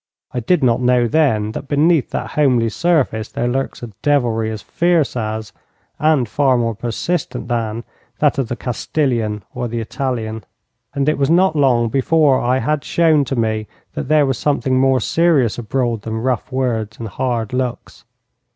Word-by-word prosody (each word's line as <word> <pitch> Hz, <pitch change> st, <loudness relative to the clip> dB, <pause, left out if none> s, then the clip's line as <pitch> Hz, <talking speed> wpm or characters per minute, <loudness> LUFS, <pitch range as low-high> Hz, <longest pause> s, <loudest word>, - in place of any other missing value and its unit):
I 125 Hz, -, -2 dB
did 150 Hz, +6 st, +1 dB
not 120 Hz, 0 st, +2 dB
know 125 Hz, -1 st, +3 dB
then 110 Hz, -7 st, +1 dB
that 135 Hz, -, -7 dB
beneath 150 Hz, +1 st, +2 dB
that -, -, -4 dB
homely 125 Hz, -6 st, +2 dB
surface 135 Hz, -8 st, 0 dB
there 120 Hz, -, -2 dB
lurks 135 Hz, 0 st, -3 dB
a 120 Hz, -, -7 dB
devilry 120 Hz, -6 st, +1 dB
as 110 Hz, -1 st, -6 dB
fierce 170 Hz, -5 st, +1 dB
as, 110 Hz, -2 st, -4 dB, 0.5 s
and 150 Hz, -5 st, +2 dB
far 135 Hz, +2 st, +2 dB
more 115 Hz, -1 st, 0 dB
persistent 120 Hz, -, -3 dB
than, 115 Hz, -1 st, -2 dB, 0.3 s
that 145 Hz, -2 st, +2 dB
of 130 Hz, -, 0 dB
the 120 Hz, -, -3 dB
Castilian 120 Hz, -4 st, -2 dB
or 125 Hz, -1 st, -3 dB
the 115 Hz, 0 st, -3 dB
Italian. 110 Hz, -3 st, -3 dB, 0.5 s
And 140 Hz, 0 st, 0 dB
it 155 Hz, -1 st, +1 dB
was 140 Hz, 0 st, +2 dB
not 175 Hz, 0 st, +3 dB
long 125 Hz, -5 st, +3 dB
before 140 Hz, +2 st, +3 dB
I 125 Hz, +2 st, +1 dB
had 150 Hz, +2 st, -1 dB
shown 160 Hz, -4 st, +3 dB
to 135 Hz, -, -3 dB
me 110 Hz, -2 st, -1 dB, 0.3 s
that -, -, -4 dB
there 155 Hz, -1 st, +4 dB
was 135 Hz, -3 st, -1 dB
something 135 Hz, -3 st, +1 dB
more 135 Hz, 0 st, +3 dB
serious 140 Hz, -2 st, +2 dB
abroad 120 Hz, -1 st, -1 dB
than 110 Hz, +1 st, -4 dB
rough 130 Hz, 0 st, -1 dB
words 115 Hz, -5 st, -2 dB
and 115 Hz, -, -6 dB
hard 120 Hz, +1 st, -2 dB
looks. 125 Hz, -1 st, -4 dB
125 Hz, 170 wpm, -18 LUFS, 115-145 Hz, 0.5 s, there